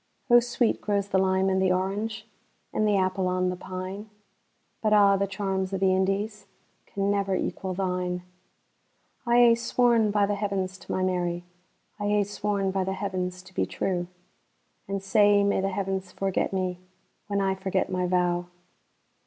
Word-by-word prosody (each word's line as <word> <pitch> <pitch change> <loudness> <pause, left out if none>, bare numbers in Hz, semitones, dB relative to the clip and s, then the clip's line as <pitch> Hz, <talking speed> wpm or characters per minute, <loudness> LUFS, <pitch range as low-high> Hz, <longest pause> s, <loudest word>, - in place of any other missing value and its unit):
O 240 - +9
sweet 240 0 0
grows 200 -1 -1
the 190 - +2
lime 190 0 +2
and 190 0 +2
the 190 -1 +3
orange, 205 +4 -2 0.5
And 215 - +1
the 205 -1 +3
apple 185 0 0
on 185 0 +1
the - - -4
pine; 185 +3 -7 0.7
But 215 -1 +2
a' 200 -1 +6
the 200 0 0
charms 190 -1 -2
o' - - 0
the 190 0 +3
IndiesCan 200 +2 -1 0.6
never 200 -1 0
equal 185 0 -3
thine.I 180 +5 -5
hae 240 -1 +7
sworn 235 -1 +2
by 205 0 +3
the 205 - -1
Heavens 195 -2 -2
to - - -9
my 185 - 0
Mary,I 180 +3 -4
hae 205 0 +3
sworn 200 -1 -1
by 190 0 0
the 190 +1 -2
Heavens 185 -2 -3
to 190 +1 -16
be - - 0
true; 175 -2 -2 0.8
And 195 0 -3
sae 205 +1 +4
may 200 -1 +2
the 195 - 0
Heavens 190 -1 -3
forget 195 0 -1
me, 185 -2 -2 0.5
When 200 -1 0
I 195 -1 +1
forget 190 0 -1
my 180 -1 0
vow! 175 -1 +1
190 Hz, 160 wpm, -26 LUFS, 185-205 Hz, 0.8 s, O